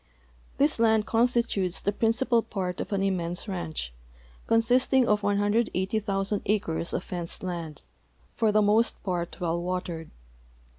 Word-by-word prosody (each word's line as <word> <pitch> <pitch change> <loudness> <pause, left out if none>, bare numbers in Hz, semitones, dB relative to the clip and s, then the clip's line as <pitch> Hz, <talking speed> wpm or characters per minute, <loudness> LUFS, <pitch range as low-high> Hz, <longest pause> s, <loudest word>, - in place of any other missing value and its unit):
This 290 -3 +2
land 220 -2 +3
constitutes 230 -6 +1
the 200 - 0
principal 230 +3 +2
part 185 -5 -4
of - - -6
an 195 -1 0
immense 180 -1 -1
ranch, 165 - -4 0.5
consisting 250 +3 +3
of 210 0 +2
180,000 205 -1 0
acres 180 -5 0
of 180 - -2
fenced 175 -1 -5
land, 170 -5 -5 0.5
for 220 -2 +2
the 215 0 +4
most 215 +3 +3
}>art 175 -2 -3
well 170 -1 -1
watered. 175 -2 -4
200 Hz, 130 wpm, -27 LUFS, 180-225 Hz, 0.5 s, the